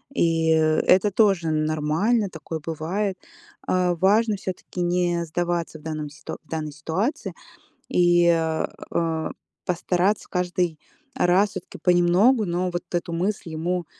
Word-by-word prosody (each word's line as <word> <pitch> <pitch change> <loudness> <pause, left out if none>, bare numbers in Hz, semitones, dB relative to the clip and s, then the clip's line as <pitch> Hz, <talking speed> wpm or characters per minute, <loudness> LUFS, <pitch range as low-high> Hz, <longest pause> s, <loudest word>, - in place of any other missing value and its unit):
И 165 -5 +2
это 160 +5 +4
тоже 190 -6 +3
нормально. 155 +8 +1
Такое 160 -1 -6
бывает. 175 +6 -3 0.5
А 180 -1 +2
важно 210 +5 +3
все-таки 185 -1 -6
не 175 -1 +1
сдаваться 170 0 -2
в - - -18
данном 155 -2 -4
в 150 +1 -10
данной 155 -2 -3
ситуации 185 - -2 0.6
и, 175 -1 +4 0.6
э, 160 -2 -1 0.4
постараться 180 +3 0
каждый 180 -3 -1 0.4
раз 190 +3 +3
все-таки - - -8
понемногу, 180 +7 +4
но 180 +1 -1
вот 175 - -3
эту 175 -1 -2
мысль 180 +1 -2
ему, 170 +2 -2
175 Hz, 120 wpm, -24 LUFS, 160-185 Hz, 0.6 s, это